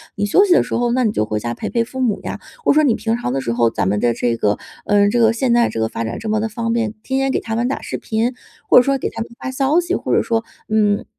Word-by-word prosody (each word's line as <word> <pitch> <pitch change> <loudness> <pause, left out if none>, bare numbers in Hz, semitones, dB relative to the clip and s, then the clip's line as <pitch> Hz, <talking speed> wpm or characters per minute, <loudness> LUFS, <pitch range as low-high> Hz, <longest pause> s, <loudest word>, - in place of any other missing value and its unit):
你 205 -2 -1
休 290 - +4
息 370 - +4
的 - - +4
时 - - -7
候， 240 0 +1
那 255 0 +2
你 220 - +2
就 105 - 0
回 105 0 -2
家 120 +2 -3
陪 - - -5
陪 235 - +1
父 260 +3 -8
母 240 -5 +1
呀。 - - -5 0.2
或 - - +4
者 - - +2
说 310 - +5
你 255 -7 +3
平 225 +1 -1
常 180 - -3
的 135 - -1
时 120 -2 -2
候， 120 -1 +3
咱 100 -4 -1
们 105 +2 +1
的 120 +1 +2
这 120 0 0
个 105 -2 +1 0.3
呃， 205 -1 +4
这 240 +3 +1
个 225 -1 +5
现 235 +1 0
在 235 0 +3
这 - - -4
个 110 - +1
发 115 - -4
展 115 0 -4
这 220 - -5
么 215 0 +1
的 220 +1 -2
方 230 +1 -2
便， 230 -2 -1
天 265 0 -1
天 270 0 +1
给 - - 0
他 225 -1 -4
们 235 +2 0
打 270 - -3
视 - - -5
频， 230 +3 -1 0.3
或 - - +6
者 - - +9
说 275 +1 +1
给 - - -3
他 - - -7
们 225 - -5
发 260 - -4
消 275 +5 +2
息， 350 +1 -2
或 - - -2
者 - - +3
说， 230 -2 0 0.3
嗯， 210 -1 +2
225 Hz, 350 characters per minute, -19 LUFS, -, 0.3 s, 者